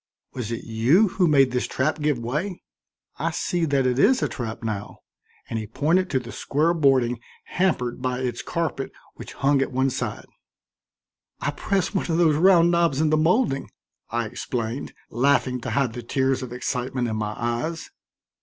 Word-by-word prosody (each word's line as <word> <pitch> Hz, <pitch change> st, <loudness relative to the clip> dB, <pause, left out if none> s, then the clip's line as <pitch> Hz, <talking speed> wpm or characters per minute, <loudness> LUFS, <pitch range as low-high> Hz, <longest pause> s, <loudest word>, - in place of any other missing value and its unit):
"Was 120 Hz, -3 st, -4 dB
it 115 Hz, -, -4 dB
you 130 Hz, -, +3 dB
who 180 Hz, -1 st, +2 dB
made 135 Hz, -4 st, +4 dB
this 125 Hz, 0 st, -1 dB
trap 150 Hz, +4 st, -1 dB
give 150 Hz, -3 st, +1 dB
way? 150 Hz, -, -3 dB, 0.6 s
I -, -, 0 dB
see 175 Hz, -2 st, -1 dB
that 140 Hz, -3 st, +1 dB
it 125 Hz, 0 st, +1 dB
is 255 Hz, -, +4 dB
a -, -, +2 dB
trap 115 Hz, -2 st, -6 dB
now," 105 Hz, -3 st, -4 dB, 0.5 s
and 115 Hz, -, -3 dB
he 110 Hz, -, -5 dB
pointed 165 Hz, -, +1 dB
to 130 Hz, -, +1 dB
the 120 Hz, -1 st, -9 dB
square 155 Hz, +4 st, +1 dB
boarding 130 Hz, -7 st, +2 dB, 0.2 s
hampered 125 Hz, -11 st, -1 dB
by 125 Hz, 0 st, -1 dB
its 125 Hz, -2 st, -2 dB
carpet 165 Hz, -5 st, -3 dB, 0.2 s
which -, -, -10 dB
hung 140 Hz, 0 st, +2 dB
at 135 Hz, -, -1 dB
one 130 Hz, +1 st, +1 dB
side. 120 Hz, -4 st, -4 dB, 1.1 s
"I -, -, -1 dB
pressed 195 Hz, -1 st, -1 dB
one 190 Hz, -, -1 dB
of 165 Hz, -, +1 dB
those 165 Hz, -3 st, +4 dB
round 175 Hz, +1 st, +5 dB
knobs 170 Hz, -5 st, +2 dB
in 155 Hz, -1 st, +2 dB
the -, -, +5 dB
molding," 160 Hz, -, +2 dB, 0.4 s
I -, -, -1 dB
explained, 115 Hz, +2 st, -4 dB, 0.2 s
laughing 130 Hz, 0 st, +2 dB
to -, -, -4 dB
hide 135 Hz, -5 st, 0 dB
the 120 Hz, -, -6 dB
tears 130 Hz, +2 st, 0 dB
of 125 Hz, -2 st, -6 dB
excitement 125 Hz, 0 st, -2 dB
in 110 Hz, -, -2 dB
my 105 Hz, 0 st, -3 dB
eyes. 120 Hz, +8 st, -3 dB
135 Hz, 180 wpm, -24 LUFS, 120-160 Hz, 1.1 s, round